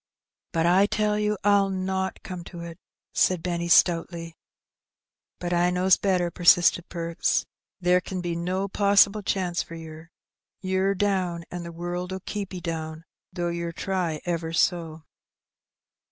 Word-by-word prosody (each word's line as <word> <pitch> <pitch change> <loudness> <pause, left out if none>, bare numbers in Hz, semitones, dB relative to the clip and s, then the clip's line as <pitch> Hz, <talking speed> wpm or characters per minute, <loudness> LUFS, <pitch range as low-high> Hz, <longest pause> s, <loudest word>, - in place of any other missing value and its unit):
" - - -65
But 165 0 +1
I 185 +4 +5
tell 210 0 0
you 210 0 0
I'll 200 -1 +4
not 190 0 -2
come 180 -2 -6
to 175 -2 -9
it," 170 +1 -8 0.3
said 180 -3 +2
Benny, 170 -1 -2
stoutly. 165 -1 +2 1.0
"But 175 0 -3
I 175 +1 +3
knows 180 +1 +4
better," 180 -3 0
persisted 175 0 +4
Perks; 170 -1 -1 0.3
"there 180 0 +3
ken 185 0 -5
be 175 -1 -3
no 185 +3 -1
possible 200 +1 +4
chance 185 -3 -1
for 165 - -9
yer. 160 0 -10 0.5
Ye're 190 +1 0
down, 185 -4 0
an' 175 - -5
the 170 0 -7
world'll 175 +2 -4
keep 205 -2 -4
'e 185 - -5
down, 160 -1 -5 0.3
though 175 -1 -2
yer 170 0 -3
try 175 -3 -2
ever 165 -2 -2
so." 165 -2 0
175 Hz, 150 wpm, -26 LUFS, 170-190 Hz, 1.0 s, I